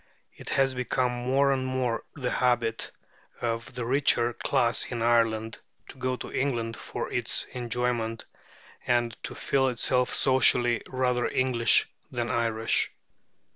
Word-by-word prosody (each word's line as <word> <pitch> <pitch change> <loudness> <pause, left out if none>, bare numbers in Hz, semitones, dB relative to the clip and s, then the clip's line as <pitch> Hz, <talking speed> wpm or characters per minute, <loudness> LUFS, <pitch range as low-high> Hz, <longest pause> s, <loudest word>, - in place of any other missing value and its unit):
It - - -10
has 135 -1 +2
become 125 0 0
more 130 +3 +1
and 130 -1 0
more 130 -2 -1
the 130 -5 -3
habit 120 -2 0 0.5
of 115 +1 -3
the 125 -2 -3
richer 120 -2 +2
class 115 0 +2
in 120 -2 -4
Ireland 115 -1 +1 0.3
to - - -11
go 130 0 -1
to - - -8
England 120 -4 -1
for - - -6
its - - +2
enjoyment, 120 -2 -2 0.6
and 120 -2 +1
to - - -6
feel 135 -1 +1
itself 125 0 +1
socially 125 -3 +4
rather 125 -1 0
English 120 -3 +2 0.2
than 120 -2 -2
Irish. 115 -1 +1
120 Hz, 135 wpm, -27 LUFS, 115-130 Hz, 0.6 s, socially